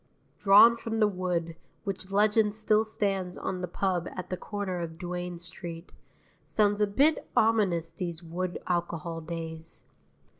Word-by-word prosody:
Drawn 210 +4 +8
from 225 -1 -3
the 215 - +5
wood, 180 -4 -2 0.3
which 195 -1 -5
legend 210 +1 +3
still 215 0 +3
stands 195 -4 -1
on 185 -1 -3
the 180 - -2
pub 180 -1 -1
at 185 -1 -6
the - - +1
corner 190 -1 -4
of 160 -1 -5
Duane 180 0 -4
Street, 170 0 -6 0.5
sounds 205 -1 +1
a 210 - +4
bit 280 +10 +2
ominous 195 -7 +3
these 170 0 -5
wood 175 +2 -3
alcohol 170 -2 -2
days. 160 0 -6
185 Hz, 145 wpm, -29 LUFS, 170-205 Hz, 0.5 s, Drawn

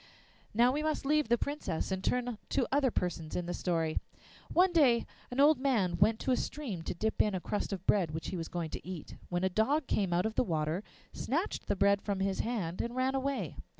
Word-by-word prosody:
Now 240 +3 +5
we 290 +3 -1
must 310 -2 -1
leave 300 -2 +2
the 240 - +4
Princess 225 - -3
and 190 0 -2
turn 245 -3 0
to 275 - +2
the - - -2
other 280 -2 +4
persons 170 -7 -3
in 180 - -1
the 175 - -3
story. 165 -3 0 0.5
One 365 +1 +4
day 255 -8 +5 0.2
an 245 - -4
old 290 0 +6
man 225 -10 +2
went 215 +4 +4
to 265 - 0
a - - +5
stream 250 - -4
to - - -3
dip 220 +5 +1
in 210 -2 +1
a - - -1
crust 205 +4 -3
of 190 -2 -4
bread 185 -6 +3
which 160 +1 -4
he - - -4
was 165 -2 -3
going 170 -3 -4
to - - -6
eat, 180 -4 -7
when 175 0 -1
a - - +4
dog 240 - +1
came 195 -7 0
out 175 +3 +2
of 220 - -1
the - - +2
water, 160 -1 -1 0.3
snatched - - -2
the - - +1
bread 200 0 +3
from 200 -2 -2
his 195 0 0
hand, 195 -8 -1
and 235 +1 -4
ran 260 +1 +1
away. 270 0 -2
210 Hz, 235 wpm, -32 LUFS, 180-260 Hz, 0.5 s, old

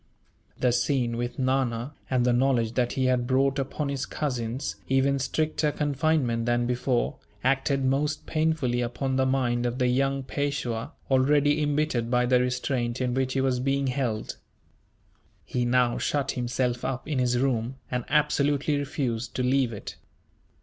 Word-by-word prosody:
The 125 - +2
scene 125 -1 +1
with 120 +1 -3
Nana, 130 0 0 0.2
and 125 -2 +2
the 125 - +3
knowledge 120 -3 +2
that 120 -1 0
he 130 - 0
had 125 -1 +1
brought 135 +1 +2
upon 140 +2 -2
his 140 -1 -3
cousins 125 -3 -3
even 135 +1 +2
stricter 155 +2 0
confinement 145 -5 0
than 120 0 +2
before, 125 0 0 0.3
acted 135 +1 +1
most 145 +3 0
painfully 155 -6 0
upon 130 +2 -2
the 130 0 +2
mind 120 -2 +1
of 120 +1 -3
the 130 - +1
young 135 +2 +1
Peishwa, 140 -1 -3 0.2
already 145 +3 +3
embittered 145 -5 0
by 125 0 +2
the 125 0 +4
restraint 125 -1 -1
in 125 -1 0
which 130 0 0
he 135 - +1
was 130 -2 +1
being 135 +2 0
held. 125 -5 -2 1.1
He 125 -1 -1
now 120 0 +2
shut 140 -2 0
himself 125 -1 -1
up 130 +1 -3
in 150 -4 -1
his 125 -1 +2
room, 125 -1 0 0.2
and 125 -1 -1
absolutely 145 0 +2
refused 125 -5 -3
to 125 - 0
leave 130 -1 +2
it. 105 - -8
130 Hz, 155 wpm, -26 LUFS, 120-140 Hz, 1.1 s, the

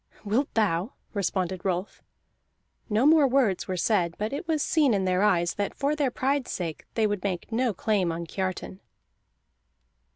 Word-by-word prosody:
"Wilt 235 +8 0
thou?" 205 -1 +1 0.2
responded 185 -2 -1
Rolf. 185 +1 -2 0.9
No 220 +4 +2
more 305 -2 +6
words 250 -8 +1
were 185 - -2
said, 175 -4 +1
but 215 +4 -3
it 290 +4 -4
was 315 -3 +1
seen 290 -8 +3
in 190 -1 0
their 185 0 +2
eyes 175 -5 +2
that 205 -1 -3
for 285 +2 0
their 290 -3 +1
pride's 265 +1 -1
sake 165 -4 -5
they 225 - +2
would 205 -3 -1
make 190 -1 -3
no 240 +1 +1
claim 195 -3 0
on 170 +1 -4
Kiartan. 185 +1 -4
205 Hz, 165 wpm, -27 LUFS, 185-260 Hz, 0.9 s, more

